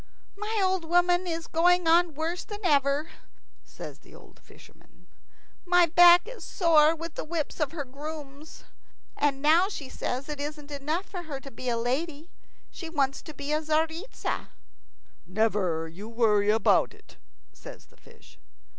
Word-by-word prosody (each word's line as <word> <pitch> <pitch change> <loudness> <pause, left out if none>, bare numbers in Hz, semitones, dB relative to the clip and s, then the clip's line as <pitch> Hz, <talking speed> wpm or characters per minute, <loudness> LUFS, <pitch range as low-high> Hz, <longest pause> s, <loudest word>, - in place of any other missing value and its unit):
"My 425 +2 -3
old 375 -2 +1
woman 355 +2 +2
is 330 -1 -3
going 355 +1 +3
on 335 -1 +4
worse 330 +4 -3
than 415 -1 -8
ever," 285 -1 +2 0.5
says - - -10
the - - -18
old - - -17
fisherman. - - -20 0.6
"My 355 -1 +5
back 350 +2 +7
is - - -9
sore 325 -3 +4
with 330 0 -7
the - - -5
whips 315 0 -4
of 300 -3 0
her 305 -4 -5
grooms. 290 +2 -9 0.5
And 280 -1 0
now 335 +6 +5
she 285 -10 -7
says 260 +2 -4
it 300 -1 -6
isn't 295 0 -6
enough 300 +6 -2
for 365 -3 -7
her 300 -5 -6
to 275 - -11
be 250 +2 -5
a 235 - 0
lady; 290 +7 -3 0.4
she 335 - -8
wants 275 -4 0
to 310 - -10
be 285 +1 -5
a 305 - +1
Tzaritza." 320 +7 -2 0.8
"Never 185 -5 0
you 190 +7 -10
worry 215 -3 +2
about 220 +1 +3
it," - - -21 0.4
says - - -12
the - - -26
fish. - - -20
310 Hz, 160 wpm, -27 LUFS, 275-345 Hz, 0.8 s, back